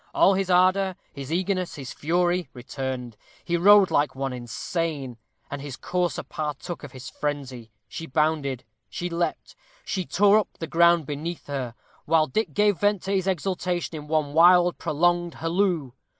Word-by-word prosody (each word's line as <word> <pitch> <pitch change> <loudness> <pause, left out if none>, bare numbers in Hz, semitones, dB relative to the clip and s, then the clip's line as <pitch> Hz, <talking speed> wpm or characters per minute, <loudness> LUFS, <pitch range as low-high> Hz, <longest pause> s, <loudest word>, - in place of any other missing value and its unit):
All 195 - +5
his 190 0 -1
ardor, 185 +1 +3 0.2
his 140 0 -7
eagerness, 185 +1 -1
his 135 -3 -7
fury, 175 +3 0
returned. 125 -1 -5 0.3
He 175 - 0
rode 200 +2 +6
like 145 -1 +1
one 135 -1 -3
insane, 130 +2 -4 0.3
and 145 - -5
his 140 -3 -7
courser 180 -2 -2
partook 155 +3 -5
of 145 - -8
his 130 0 -10
frenzy. 135 -6 -4 0.2
She 165 - -7
bounded; 150 -3 0 0.3
she 175 0 -4
leaped; 170 0 -3 0.3
she 185 - -2
tore 205 +2 +5
up 210 - -5
the 165 - -4
ground 170 -1 +4
beneath 155 +5 -5
her; 130 -5 -4 0.3
while 160 0 +3
Dick 215 +11 -2
gave 205 -2 +3
vent 205 -2 +1
to 195 - -3
his 195 -1 0
exultation 180 -1 -2
in 150 -1 -7
one 155 -2 0
wild, 175 +2 +5
prolonged 175 +2 +1
halloo. 165 -4 0
165 Hz, 160 wpm, -25 LUFS, 145-180 Hz, 0.3 s, rode